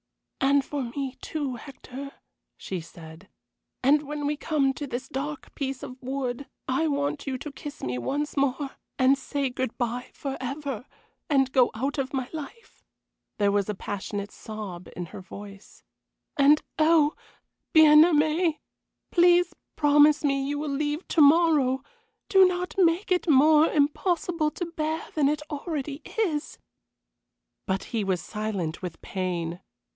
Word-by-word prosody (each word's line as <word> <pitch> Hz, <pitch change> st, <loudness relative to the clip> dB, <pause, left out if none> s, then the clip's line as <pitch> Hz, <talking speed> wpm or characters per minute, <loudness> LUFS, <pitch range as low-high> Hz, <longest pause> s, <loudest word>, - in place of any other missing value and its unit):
"And 275 Hz, 0 st, +3 dB
for 285 Hz, -2 st, -3 dB
me, 260 Hz, +2 st, -4 dB
too, 285 Hz, -5 st, -3 dB
Hector," 275 Hz, +2 st, -9 dB, 0.4 s
she 185 Hz, -3 st, -5 dB
said. 160 Hz, +2 st, -13 dB, 0.5 s
"And 290 Hz, +3 st, +5 dB
when 295 Hz, 0 st, -5 dB
we 295 Hz, +1 st, 0 dB
come 285 Hz, -3 st, +1 dB
to 290 Hz, +1 st, -6 dB
this 250 Hz, -1 st, -4 dB
dark 290 Hz, +2 st, -5 dB
piece 270 Hz, -2 st, -4 dB
of 255 Hz, 0 st, -9 dB
wood 260 Hz, 0 st, -3 dB, 0.2 s
I 270 Hz, +5 st, +1 dB
want 285 Hz, 0 st, -1 dB
you 265 Hz, -1 st, -1 dB
to 295 Hz, +3 st, -7 dB
kiss 285 Hz, +1 st, -9 dB
me 125 Hz, -1 st, -2 dB
once 290 Hz, -, -2 dB
more 275 Hz, 0 st, 0 dB, 0.3 s
and 260 Hz, +1 st, +5 dB
say 280 Hz, 0 st, -2 dB
good 255 Hz, -1 st, -3 dB
bye 245 Hz, +1 st, -2 dB
forever, 270 Hz, -2 st, -5 dB, 0.4 s
and 270 Hz, -3 st, +3 dB
go 255 Hz, -2 st, +4 dB
out 270 Hz, +6 st, -2 dB
of 265 Hz, 0 st, -2 dB
my 260 Hz, -2 st, -1 dB
life." 320 Hz, +9 st, -9 dB, 0.5 s
There 205 Hz, -1 st, +3 dB
was 205 Hz, 0 st, +1 dB
a 210 Hz, -, -1 dB
passionate 200 Hz, +1 st, -5 dB
sob 205 Hz, -5 st, -8 dB
in 175 Hz, -1 st, -5 dB
her 190 Hz, -, -9 dB
voice. 200 Hz, +1 st, -12 dB, 0.5 s
"And 290 Hz, +2 st, +5 dB, 0.2 s
oh! 310 Hz, -1 st, +5 dB, 0.6 s
Bien 305 Hz, -2 st, +8 dB
aimé, 315 Hz, 0 st, +2 dB, 0.5 s
please 350 Hz, 0 st, +5 dB, 0.2 s
promise 295 Hz, 0 st, +5 dB
me 275 Hz, -1 st, +1 dB
you 290 Hz, +1 st, -1 dB
will 300 Hz, 0 st, -3 dB
leave 295 Hz, +4 st, -2 dB
to 325 Hz, -, +3 dB
morrow. 290 Hz, -4 st, +5 dB, 0.4 s
Do 385 Hz, -1 st, +7 dB
not 360 Hz, 0 st, -2 dB
make 360 Hz, +1 st, +2 dB
it 360 Hz, -1 st, +2 dB
more 305 Hz, +2 st, +6 dB
impossible 320 Hz, +2 st, +1 dB
to 350 Hz, -, -4 dB
bear 320 Hz, -1 st, -3 dB
than 290 Hz, -3 st, +3 dB
it 300 Hz, 0 st, -1 dB
already 290 Hz, -1 st, -4 dB, 0.2 s
is." 325 Hz, -9 st, -1 dB, 1.1 s
But 190 Hz, -1 st, -1 dB
he 220 Hz, -, +1 dB
was 190 Hz, -2 st, 0 dB
silent 200 Hz, -6 st, -3 dB
with 175 Hz, -3 st, -6 dB
pain. 175 Hz, -2 st, -3 dB
280 Hz, 150 wpm, -26 LUFS, 245-300 Hz, 1.1 s, Bien